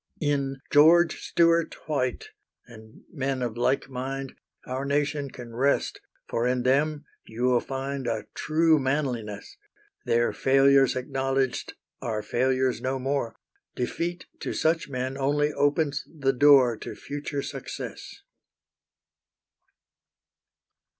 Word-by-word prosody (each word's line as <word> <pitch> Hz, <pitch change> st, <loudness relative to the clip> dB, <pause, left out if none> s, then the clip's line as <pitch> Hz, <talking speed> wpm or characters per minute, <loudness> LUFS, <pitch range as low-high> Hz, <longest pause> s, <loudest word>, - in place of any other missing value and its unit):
In 140 Hz, -2 st, 0 dB
George 165 Hz, +4 st, +5 dB
Stewart 170 Hz, -1 st, +2 dB
White, 130 Hz, -5 st, -2 dB, 0.4 s
and 110 Hz, -2 st, -15 dB
men 135 Hz, -3 st, -2 dB
of 120 Hz, -2 st, -3 dB
like 125 Hz, +3 st, +1 dB
mind, 135 Hz, +1 st, -5 dB, 0.3 s
Our 130 Hz, +1 st, -3 dB
nation 145 Hz, 0 st, -1 dB
can 120 Hz, -3 st, -10 dB
rest, 140 Hz, +4 st, +1 dB, 0.3 s
for 115 Hz, +1 st, 0 dB
in 125 Hz, 0 st, 0 dB
them 145 Hz, +3 st, +1 dB, 0.2 s
you 115 Hz, +2 st, -5 dB
will 125 Hz, -1 st, +4 dB
find 135 Hz, 0 st, -4 dB
A 110 Hz, -2 st, -2 dB
true 160 Hz, 0 st, +3 dB
manliness; 130 Hz, -7 st, -3 dB, 0.5 s
Their 120 Hz, 0 st, +2 dB
failures 135 Hz, 0 st, +4 dB
acknowledged 135 Hz, 0 st, -1 dB, 0.3 s
are 110 Hz, -3 st, -3 dB
failures 130 Hz, +1 st, +1 dB
no 130 Hz, +1 st, -1 dB
more; 130 Hz, -3 st, -2 dB, 0.4 s
Defeat 170 Hz, +8 st, -3 dB
to -, -, -4 dB
such 160 Hz, -1 st, +1 dB
men 130 Hz, +1 st, -3 dB
only 145 Hz, +2 st, +1 dB
opens 145 Hz, 0 st, +1 dB
the 135 Hz, -4 st, 0 dB
door 130 Hz, -3 st, +6 dB
To -, -, -7 dB
future 145 Hz, 0 st, -5 dB
success. -, -, -7 dB
135 Hz, 115 wpm, -26 LUFS, 125-145 Hz, 0.5 s, door